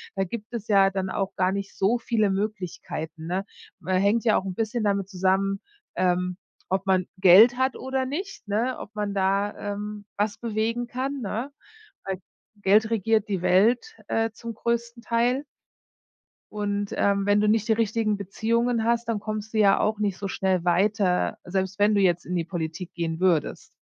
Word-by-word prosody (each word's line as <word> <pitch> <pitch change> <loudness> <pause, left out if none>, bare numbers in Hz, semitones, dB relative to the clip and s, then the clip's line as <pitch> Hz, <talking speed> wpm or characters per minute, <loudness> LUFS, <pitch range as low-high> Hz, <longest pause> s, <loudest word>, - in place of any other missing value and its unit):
da 195 - +1
gibt 215 +4 -7
es 225 -2 -5
ja 195 -2 +5
dann 190 -1 -3
auch 195 0 -2
gar 185 0 +2
nicht 200 0 -4
so 205 +5 +2
viele 220 -3 +1
Möglichkeiten, 180 -5 -4
ne? 190 +3 -2 0.3
Ma 190 - -5
hängt 200 +5 +3
ja 220 - +4
auch 190 - -2
'n 190 - -3
bisschen 225 +1 -1
damit 200 -1 0
zusammen, 195 +1 +1 0.4
ähm, 180 0 0 0.3
ob 190 0 0
man 185 -2 +2
Geld 200 +7 +7
hat 260 0 +1
oder 265 0 -2
nicht, 365 - -5
ne, 230 +5 0
ob 215 - -9
man 205 -1 -2
da, 200 +1 0
ähm, 205 0 -6
was 210 +1 0
bewegen 230 +1 -1
kann, 270 +3 -3
ne? 225 +6 -3 0.5
Weil 190 -2 -3 0.4
Geld 215 +3 +4
regiert 220 0 +1
die 195 -4 -2
Welt, 230 - +3
äh, 225 0 +1
zum 230 0 -7
größten 235 +1 -2
Teil. 245 +4 +1 1.1
Und, 205 -1 -2
ähm, 200 -1 +2
wenn 205 0 +3
du 210 - +2
nicht 220 0 +2
die 225 - +4
richtigen 220 -1 0
Beziehungen 230 +4 0
hast, 235 0 0
dann 220 - 0
kommst 215 +1 -5
du - - -1
ja 200 -2 +5
auch 215 0 +1
nicht 200 -3 0
so 200 - -4
schnell 185 -2 0
weiter, 185 +1 +2
selbst 190 +1 -2
wenn 210 +1 +4
du 200 - +3
jetzt 175 -2 +2
in 180 - -3
die 170 -2 0
Politik 170 0 -5
gehen 165 -1 -3
würdest. 175 -5 0
205 Hz, 180 wpm, -25 LUFS, 190-225 Hz, 1.1 s, Geld